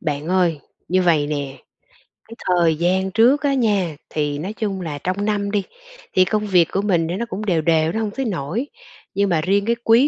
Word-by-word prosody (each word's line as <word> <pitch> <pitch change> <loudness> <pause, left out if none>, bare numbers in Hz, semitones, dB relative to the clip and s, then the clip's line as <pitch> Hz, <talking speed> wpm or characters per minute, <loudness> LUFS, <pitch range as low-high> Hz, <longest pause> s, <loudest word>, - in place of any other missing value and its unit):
Bạn 150 -2 -3
ơi, 180 -4 +2 0.3
như 185 +1 +2
vầy 160 -5 +3
nè, 145 -2 -4 0.7
cái 230 - -10
thời 170 -3 +3
gian 185 +4 0
trước 240 +7 +4
á 280 - +2
nha 205 - +1
thì, 145 -2 -1
nói 190 +7 -4
chung 205 -4 -3
là, 155 -4 -4
trong 185 +6 -2
năm 205 -1 -1
đi 205 -2 0 0.5
thì 185 - +5
công 210 +1 -1
việc 180 -4 +4
của 195 - 0
mình 175 -5 +1
thì 170 - -2
nó 235 +5 -2
cũng 210 +2 -4
đều 175 -6 +1
đều, 160 0 +2
nó 220 - -2
hông 215 -2 -2
tới 270 +5 -3
nỗi. 190 - -2 0.5
Nhưng 200 0 +2
mà 165 -3 +2
riêng 200 +4 +1
cái 235 +1 +2
quý 235 +5 +5
185 Hz, 220 wpm, -21 LUFS, 165-210 Hz, 0.7 s, thì